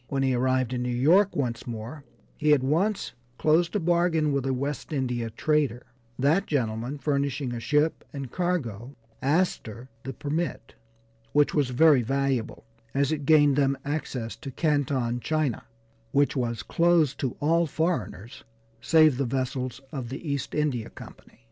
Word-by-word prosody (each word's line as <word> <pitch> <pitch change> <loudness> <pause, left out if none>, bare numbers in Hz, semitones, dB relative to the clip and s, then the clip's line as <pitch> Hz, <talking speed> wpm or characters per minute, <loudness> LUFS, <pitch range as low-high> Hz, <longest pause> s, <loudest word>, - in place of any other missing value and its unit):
When 135 -1 -1
he 130 -1 +2
arrived 130 0 +1
in 125 - -2
New 125 - -2
York 165 +12 +3
once 120 -5 -2
more 120 +6 -6 0.3
he 150 -1 +3
at 135 -3 +2
once 185 +9 0 0.2
closed 165 +3 +2
a - - +3
bargain 170 -3 +2
with 140 -1 -1
a 135 - +1
West 140 +5 -4
India 125 -5 -1
trader, 135 0 0 0.3
that 155 +9 +2
gentleman 120 -1 -2
furnishing 140 -3 -1
a 120 - -4
ship 150 +6 +1
and 135 -4 -6
cargo, 140 - -2 0.3
Astor 135 - -1
the 135 - -5
permit, 155 +7 -3 0.6
which 145 0 +3
was 145 -4 +1
very 140 +1 +5
valuable, 135 -2 -1 0.3
as 140 +1 +2
it 145 -3 -3
gained 145 -3 +5
them 140 -1 +2
access 140 -6 -3
to 140 - -8
Canton, 135 -5 0
China, 155 -2 -1 0.5
which 140 +1 +3
was 120 -3 -2
closed 165 -5 +2
to 130 -3 -2
all 165 +3 +2
foreigners 130 - -3 0.4
save 155 -5 +4
the 140 - +1
vessels 130 +1 -3
of 130 -6 -5
the 135 +6 -7
East 140 -1 -3
India 140 -7 -1
Company. - - -14
140 Hz, 155 wpm, -26 LUFS, 125-155 Hz, 0.6 s, very